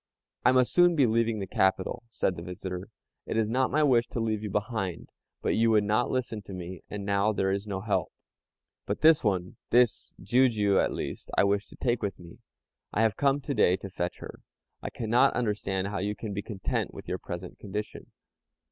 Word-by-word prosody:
"I 125 - +6
must 130 -1 +3
soon 175 -1 +5
be 140 -4 +5
leaving 115 -1 +1
the 100 - -3
capital," 95 +1 0
said 95 -5 -1
the 85 - -7
visitor. 90 +1 -6 0.4
"It - - -2
is 110 -1 +2
not 130 +3 +1
my 155 +3 +2
wish 120 -5 +4
to - - -4
leave 110 -2 -1
you 105 - -4
behind, 100 -3 -3 0.3
but - - +1
you 115 +1 +3
would 110 -2 +4
not 110 +4 +1
listen 120 -4 -2
to 95 0 -10
me, 90 -1 -7
and 105 -1 -5
now 100 +1 +2
there 95 -2 0
is 100 +2 -2
no 95 -2 -3
help. 95 -5 -1 0.8
But 100 - -2
this 160 -1 +6
one, 95 -4 -1
this 120 -1 +3
Jijiu 105 -2 +3
at - - 0
least, - - -5
I - - +6
wish 100 +1 +1
to - - -14
take 120 -2 0
with 100 -4 -3
me. 85 -1 -13 0.5
I 110 - +1
have 110 -3 +2
come 140 0 +2
to 140 - -3
day 95 -6 +4
to 95 0 -9
fetch 90 -1 -3
her. - - -9 0.4
I - - -4
cannot 120 +4 +2
understand 100 -4 -1
how 100 - -3
you 105 +2 -2
can 105 0 -6
be 100 - -2
content 100 -3 -3
with - - -10
your - - -3
present 90 +1 -7
condition." 105 +1 -6
105 Hz, 210 wpm, -28 LUFS, 95-115 Hz, 0.8 s, I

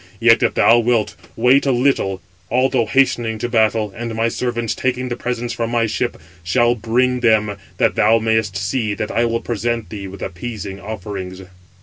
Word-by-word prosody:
Yet, 115 0 +5
if - - +1
thou 120 +1 +5
wilt, 115 -2 +1 0.2
wait 125 +5 +3
a - - +4
little, 120 -7 +1 0.3
although 130 -1 +2
hastening 120 -4 +1
to 115 - -3
battle, 110 -3 +1
and 115 -1 -5
my 115 +1 +1
servants, 120 -1 -2
taking 125 0 -2
the 120 - -2
presents 120 -1 -3
from 115 0 -2
my 120 -1 +1
ship, 120 +2 -2 0.2
shall 120 +8 +2
bring 125 +2 0
them, 110 -3 +2 0.2
that - - +2
thou 110 +2 +4
mayest 110 -3 0
see 105 +1 -1
that 105 - -4
I 120 - +1
will 115 0 -1
present 120 -1 -2
[thee] 100 -3 -6
with 95 0 -9
appeasing 100 +1 -6
offerings." 95 -2 -6
115 Hz, 180 wpm, -19 LUFS, 105-120 Hz, 0.3 s, Yet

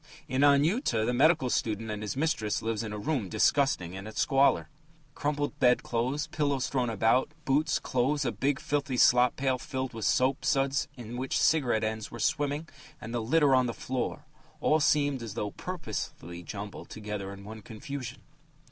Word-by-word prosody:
In 130 +1 0
Anyuta, 145 - +3
the 125 - 0
medical 135 -1 +3
student 110 0 -1
and 105 0 -4
his 105 +4 -4
mistress 125 -9 0
live 115 -1 -1
in 110 -2 -5
a 105 - -4
room 115 -3 -2
disgusting 115 -12 +2
in 95 +2 -7
its 110 - -6
squalor: 135 0 +3 0.5
Crumpled 145 0 -2
bed 125 -2 +4
clothes, 125 +5 -1
pillows 145 -4 -1
thrown 125 -3 0
about, 115 +5 +2 0.2
boots, 150 +3 +2
clothes, 135 +3 0
a 120 - +1
big 135 +6 0
filthy 140 -3 -1
slop 125 +1 +5
pail 130 -1 0
filled 130 -3 -4
with 115 -2 -4
soap 130 +1 +2
suds 135 +1 +1
in 120 0 -7
which 130 +1 -1
cigarette 125 -8 +2
ends 110 0 -3
were 120 - -9
swimming, 145 +7 0 0.3
and 115 +2 -7
the 120 - -1
litter 140 +4 +3
on 130 -1 +4
the 115 - -4
floor 130 +4 -3 0.3
all 155 - +3
seemed 145 -3 +2
as 110 -3 -6
though 105 -3 -2
purposely 110 - -6
jumbled 100 +3 -7
together 105 -2 -5
in 100 0 -10
one 110 +2 -9
confusion.... 125 +4 -7
125 Hz, 175 wpm, -29 LUFS, 110-140 Hz, 0.5 s, slop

